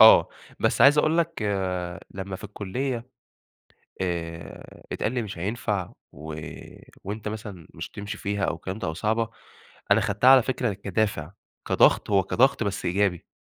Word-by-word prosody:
آه. 110 -6 +9 0.3
بس - - +2
عايز 145 +2 +8
أقول 160 +2 +3
لك 165 -6 0 0.7
لمّا 95 0 -5
في 95 - -11
الكُلية 115 +5 -3 0.9
آآ 85 -4 -5
اتقال 110 - -1
لي 125 -2 0
مش 105 -4 -7
هينفع 100 -1 -2 0.2
و 75 +2 -7 0.7
وأنت 105 +2 -4
مثلًا 105 -6 -7
مش - - -6
هتمشي 105 0 -6
فيها 100 -1 -1
أو - - 0
الكلام 95 +5 -6
ده - - -3
أو 80 - -3
صعبة، 110 +4 0 0.6
أنا - - +6
خدتها 105 +6 +4
على 135 -1 +9
فكرة 125 -2 -1
كدافع، 95 -4 -1 0.3
كضغط - - +4
هو 100 -1 +5
كضغط 135 +4 +3
بس 100 -1 -2
إيجابي. 90 -1 +1
105 Hz, 150 wpm, -26 LUFS, 95-115 Hz, 0.9 s, آه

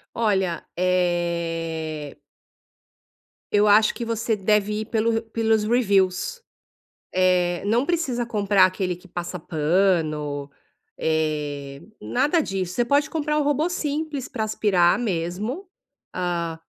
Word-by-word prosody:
Olha, 190 -6 0
eh 170 -4 -1 1.3
eu 205 0 +4
acho 210 +1 +5
que 240 - -4
você 230 -1 -1
deve 210 +1 +1
ir - - -4
pelo 225 0 +1
r 225 0 0
pelos 220 -1 +2
reviews. 210 - +1 0.7
Eh, 180 -1 +2
não 230 +5 +2
precisa 280 -7 -1
comprar 205 -3 +3
aquele 185 -1 0
que 180 +2 -18
passa 175 +1 -5
pano, 155 -3 0 0.5
eh, 150 -3 -2 0.2
nada 290 +7 +1
disso, 190 - -3
você 240 - +2
pode 285 +4 +2
comprar 300 -1 -1
um - - +2
robô 290 +3 +1
simples, 300 -5 -3
pra 225 -5 -3
aspirar 195 -5 +2
mesmo. 210 - -3 0.5
Ah, 170 -2 -2
195 Hz, 120 wpm, -23 LUFS, 170-235 Hz, 1.3 s, acho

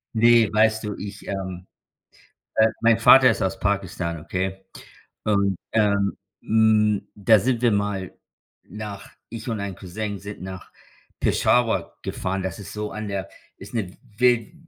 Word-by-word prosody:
Ne, 115 -1 +5
weißt 110 +1 +3
du, 105 -1 -4
ich 100 0 -8
ähm 95 -2 -5 0.9
äh, 110 - +6
mein 115 -1 +4
Vater 130 +2 +8
ist 110 - -1
aus 95 - -1
Pakistan, 90 -4 -2
okay? 95 +4 -4 0.6
Und, 100 -2 +1 0.2
ähm, 100 -2 +2 0.2
hm, 110 -2 +3
da 105 +2 +5
sind 120 +3 0
wir 120 - +4
mal 100 -2 -1 0.5
nach 105 -2 -8 0.2
ich 115 +1 -7
und 110 -3 -2
ein 100 -2 -5
Cousin 100 +2 -5
sind 100 -1 -9
nach 95 -1 -8 0.5
Peshawar 120 -2 +1
gefahren. 95 +1 -3
Das 95 -2 -4
ist 100 -4 -9
so 105 0 -4
an 105 +1 -5
der 95 -3 -4 0.3
ist 100 +4 -11
'ne 100 -5 -3 0.2
wild 120 +1 +2
105 Hz, 145 wpm, -23 LUFS, 95-110 Hz, 0.9 s, Vater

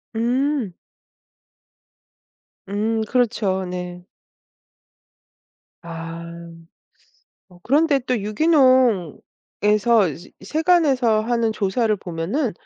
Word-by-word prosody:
음. 250 -2 0 2.0
음, 220 +3 -1
그렇죠. 210 -6 0
네. 180 0 -6 1.8
아. 165 0 -7 1.3
어 180 - -18
그런데 290 +2 +2
또 250 -1 -1
유기농에서 220 - +2
이제 175 +5 -12
세관에서 295 -9 +2
하는 230 0 0
조사를 215 +2 0
보면은 190 - -3
220 Hz, 145 characters per minute, -21 LUFS, 190-255 Hz, 2.0 s, 그런데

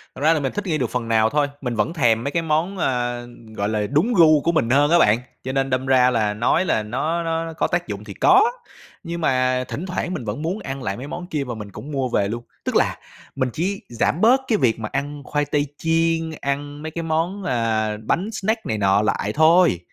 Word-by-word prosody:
Thật 130 - -9
ra 155 +2 +5
là 160 - 0
mình 135 -2 -2
thích 205 - -3
nghi 160 -3 +1
được 125 -6 -1
phần 125 -2 -3
nào 110 -1 +3
thôi, 145 +1 +1
mình 125 -3 -3
vẫn 110 +10 0
thèm 120 -7 +2
mấy 140 - -2
cái 170 - 0
món, 165 +4 0
ờ, 120 -5 -1 0.3
gọi 100 0 -1
là, 105 -1 -1
đúng 170 +12 +2
gu 155 -6 +6
của 170 - +1
mình 160 -9 +1
hơn 145 +4 +4
á 175 - +6
bạn. 105 -5 +4 0.2
Cho 130 - -3
nên 135 0 0
đâm 130 0 -1
ra 130 -1 +4
là 110 -4 +1
nói 120 - +1
là 110 -10 +1
nó 150 +10 -2
nó 165 0 -2
có - - +1
tác 175 -5 -1
dụng 105 0 -5
thì 105 -2 -9
có, 390 - +5 0.5
nhưng 170 +1 -5
mà 130 -3 +1
thỉnh 170 - -5
thoảng 180 -1 -3
mình 125 - -5
vẫn 105 +7 -4
muốn 175 +6 -2
ăn 135 -5 -6
lại 100 -4 -3
mấy 130 +4 -7
món 175 +4 -6
kia 150 -5 -2
mà 125 -3 -5
mình 105 -2 -8
cũng 145 +9 -9
mua 135 -3 -1
về 100 -4 +1
luôn. 115 +3 -4 0.2
Tức - - -2
là - - +2 0.4
mình 130 -2 0
chỉ 195 +5 -2
giảm 120 +7 0
bớt 250 +4 +5
cái 220 - +2
việc 115 - +1
mà 110 -1 -4
ăn 145 +1 -3
khoai 150 +1 -1
tây 145 0 0
chiên, 165 0 +1
ăn 145 +1 -3
mấy 160 - -5
cái 165 +1 -4
món, 165 +5 -1
ờ, 110 -8 0
bánh 180 - 0
snack 220 +2 -2
này 110 - -1
nọ 100 0 +3
lại 105 -1 0
thôi, 160 - +5
145 Hz, 245 wpm, -22 LUFS, 120-165 Hz, 0.5 s, gu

